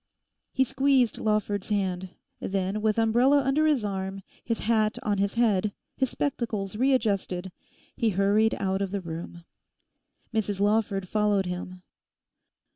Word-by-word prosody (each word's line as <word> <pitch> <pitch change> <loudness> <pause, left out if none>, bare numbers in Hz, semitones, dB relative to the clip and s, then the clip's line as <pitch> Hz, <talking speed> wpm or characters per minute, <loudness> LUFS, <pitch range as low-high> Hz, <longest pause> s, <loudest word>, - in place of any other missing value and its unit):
He 265 - +3
squeezed 265 -2 +2
Lawford's 210 -2 0
hand. 190 -3 -1 0.3
Then, 195 +2 -2
with 215 0 +1
umbrella 245 +5 +4
under 285 +4 +2
his 280 -8 +2
arm, 195 -1 -4 0.2
his 230 -1 -2
hat 215 -1 +1
on 205 -2 0
his 200 +2 0
head, 210 -4 +2 0.2
his 265 -1 0
spectacles 220 -8 -2
readjusted, 205 -7 0 0.4
he 230 -3 +1
hurried 205 +3 +2
out 190 0 -1
of 195 - -1
the 200 0 -3
room. 170 0 -7 0.9
Mrs 205 -3 -1
Lawford 205 -2 +1
followed 210 -1 +1
him. 180 0 -6
210 Hz, 130 wpm, -27 LUFS, 195-230 Hz, 0.9 s, umbrella